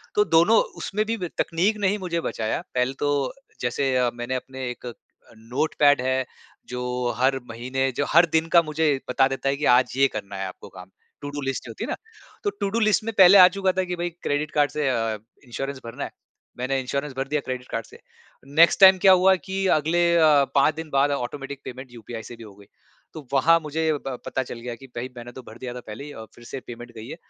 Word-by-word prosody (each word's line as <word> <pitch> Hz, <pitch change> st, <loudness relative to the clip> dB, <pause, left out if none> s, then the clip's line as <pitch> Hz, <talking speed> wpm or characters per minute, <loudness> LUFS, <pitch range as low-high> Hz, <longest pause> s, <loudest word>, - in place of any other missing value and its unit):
तो 210 Hz, -, +4 dB
दोनों 175 Hz, +6 st, +5 dB, 0.3 s
उसमें 215 Hz, +2 st, -1 dB
भी 230 Hz, +1 st, -2 dB
ब 180 Hz, -4 st, -4 dB
तकनीक 190 Hz, +6 st, +1 dB
ने 200 Hz, -, +2 dB
ही 205 Hz, -, 0 dB
मुझे 170 Hz, -3 st, -3 dB
बचाया। 110 Hz, -7 st, -2 dB
पहले 125 Hz, +1 st, +1 dB
तो 145 Hz, -2 st, 0 dB, 0.3 s
जैसे 130 Hz, +2 st, 0 dB
अ, 125 Hz, -1 st, +2 dB
मैंने 120 Hz, +2 st, -4 dB
अपने 130 Hz, 0 st, -5 dB
एक 125 Hz, -1 st, -7 dB, 0.6 s
नोटपैड 145 Hz, 0 st, +3 dB
है 130 Hz, 0 st, 0 dB, 0.4 s
जो 125 Hz, 0 st, -2 dB
हर 130 Hz, +1 st, +2 dB
महीने 130 Hz, +3 st, -2 dB
जो 145 Hz, -, +1 dB
हर 170 Hz, +2 st, +6 dB
दिन 160 Hz, 0 st, +2 dB
का 170 Hz, -, +9 dB
मुझे 155 Hz, 0 st, -2 dB, 0.2 s
बता 130 Hz, +1 st, +3 dB
देता 135 Hz, 0 st, -2 dB
है 140 Hz, -, +1 dB
कि 150 Hz, -, -2 dB
आज 125 Hz, -2 st, +2 dB
ये 135 Hz, -, +5 dB
करना 100 Hz, -4 st, -7 dB
है 95 Hz, 0 st, -3 dB
आपको 95 Hz, -, -11 dB
काम 90 Hz, 0 st, -12 dB, 0.3 s
टू 145 Hz, -, -5 dB
डू 145 Hz, 0 st, -5 dB
लिस्ट 135 Hz, 0 st, -3 dB
जो -, -, -7 dB
होती -, -, -7 dB
है -, -, -4 dB
ना। -, -, -1 dB, 0.5 s
तो 410 Hz, -, +1 dB
टू 200 Hz, -, 0 dB
डू 230 Hz, +4 st, -1 dB
लिस्ट 215 Hz, 0 st, +2 dB
में 225 Hz, -, -3 dB
पहले 190 Hz, +1 st, +9 dB
आ 180 Hz, -1 st, +10 dB
चुका 190 Hz, -1 st, +2 dB
था -, -, +2 dB
कि 180 Hz, -1 st, -4 dB
भई 175 Hz, 0 st, -2 dB
क्रेडिट 150 Hz, +2 st, -1 dB
कार्ड 145 Hz, -1 st, +2 dB
से 150 Hz, -2 st, -1 dB
अ, 115 Hz, -3 st, -1 dB, 0.3 s
इंश्योरेंस 135 Hz, +2 st, -5 dB
भरना 115 Hz, -, -6 dB
है। -, -, -6 dB, 0.5 s
मैंने 130 Hz, +2 st, -1 dB
इंश्योरेंस 140 Hz, +2 st, -3 dB
भर 135 Hz, -, -2 dB
दिया 150 Hz, +1 st, -1 dB
क्रेडिट 125 Hz, -1 st, -5 dB
कार्ड 115 Hz, -1 st, -3 dB
से। -, -, -16 dB, 0.6 s
नेक्स्ट 170 Hz, +4 st, +6 dB
टाइम 190 Hz, -1 st, +9 dB
क्या 190 Hz, -, +7 dB
हुआ 190 Hz, +1 st, +6 dB
कि 190 Hz, +1 st, -4 dB
अगले 170 Hz, +3 st, +1 dB
अ, 155 Hz, -4 st, +5 dB
5 140 Hz, +2 st, +4 dB
दिन 160 Hz, 0 st, -7 dB
बाद 140 Hz, 0 st, +2 dB
ऑटोमैटिक 135 Hz, +1 st, -4 dB
पेमेंट 130 Hz, 0 st, -8 dB
यूपीआई 115 Hz, -1 st, -8 dB
से 120 Hz, -, -10 dB
भी 115 Hz, -, -12 dB
हो 100 Hz, -3 st, -13 dB
गई। 100 Hz, -, -17 dB, 0.5 s
तो 155 Hz, -3 st, -9 dB
वहाँ 165 Hz, +5 st, +5 dB
मुझे 160 Hz, +1 st, -1 dB
ब 135 Hz, -3 st, -5 dB
पता 130 Hz, -, -2 dB
चल 120 Hz, -, -8 dB
गया 120 Hz, 0 st, -6 dB
कि 135 Hz, +3 st, -14 dB
भई 120 Hz, +2 st, -4 dB
मैंने 120 Hz, 0 st, -8 dB
तो 130 Hz, -, -10 dB
भर 110 Hz, -, -11 dB
दिया 125 Hz, -1 st, -6 dB
था 125 Hz, -, -7 dB
पहले 110 Hz, +6 st, -7 dB
ही 145 Hz, -, -9 dB
और 110 Hz, -, -8 dB
फ़िर 120 Hz, -, -15 dB
से 135 Hz, -, -6 dB
पेमेंट 120 Hz, 0 st, -9 dB
गयी 110 Hz, +2 st, -9 dB
है। -, -, -6 dB
135 Hz, 235 wpm, -24 LUFS, 125-165 Hz, 0.6 s, आ